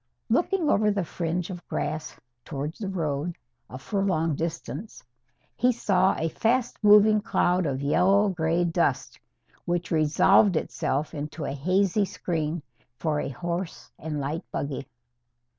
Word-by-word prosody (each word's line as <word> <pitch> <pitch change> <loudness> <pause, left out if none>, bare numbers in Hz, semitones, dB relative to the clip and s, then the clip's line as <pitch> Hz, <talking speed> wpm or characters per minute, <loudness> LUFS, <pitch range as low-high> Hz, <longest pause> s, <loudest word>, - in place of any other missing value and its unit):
Looking 385 -5 +1
over 210 -5 +3
the 200 -2 0
fringe 170 +2 -3
of 175 -1 -9
grass, 155 0 -3 0.3
towards 145 +1 -5
the 205 - -3
road, 165 -2 -2 0.3
a 130 - -7
furlong 180 -1 0
distant, 165 +4 -5 0.6
he 250 - +3
saw 195 -6 +2
a 160 - 0
fast 235 - 0
moving 210 +1 +6
cloud 180 -5 +1
of 135 0 -2
yellow 195 +8 +4
grey 170 -1 +1
dust, 170 -1 0 0.5
which 175 +1 -2
resolved 160 +5 +4
itself 145 0 -2
into 150 0 -5
a - - -2
hazy 185 +7 +1
screen 165 -4 -3 0.3
for 155 -2 -1
a - - -2
horse 170 +6 -5
and 150 -1 -4
light 145 +4 -2
buggy. 140 -2 -4
170 Hz, 135 wpm, -26 LUFS, 155-195 Hz, 0.6 s, moving